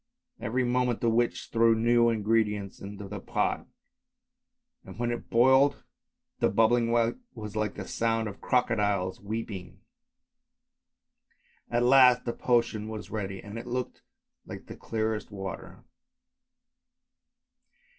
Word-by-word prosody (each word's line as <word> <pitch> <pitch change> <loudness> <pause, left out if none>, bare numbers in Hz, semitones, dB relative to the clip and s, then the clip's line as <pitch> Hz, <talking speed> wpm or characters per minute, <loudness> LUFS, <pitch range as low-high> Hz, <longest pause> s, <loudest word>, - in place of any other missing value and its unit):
Even* 125 +1 0
moment 125 -1 +1
the 115 - +2
witch 120 +1 0
threw 115 0 +4
new 120 +1 +4
ingredients 105 -2 0
into 100 0 -8
the 105 +1 -6
pot, - - -1 1.2
and - - -12
when 120 0 -1
it 120 - -5
boiled 130 +4 +4 0.6
the - - +3
bubbling 115 +3 +3
was 115 - -2
like 105 -1 -1
the 95 - -7
sound 115 -1 0
of 100 - -9
crocodiles 105 -7 0
weeping. 100 -4 -6 1.9
At 120 0 +1
last 125 -1 +6
the 120 - -2
potion 115 -4 0
was 110 -1 -7
ready 95 -3 -4
and 105 +2 -7
it 120 - -9
looked 125 +1 -4 0.4
like - - -9
the - - -9
clearest 110 -1 -3
water. 95 -2 -7
115 Hz, 120 wpm, -28 LUFS, 105-120 Hz, 1.9 s, last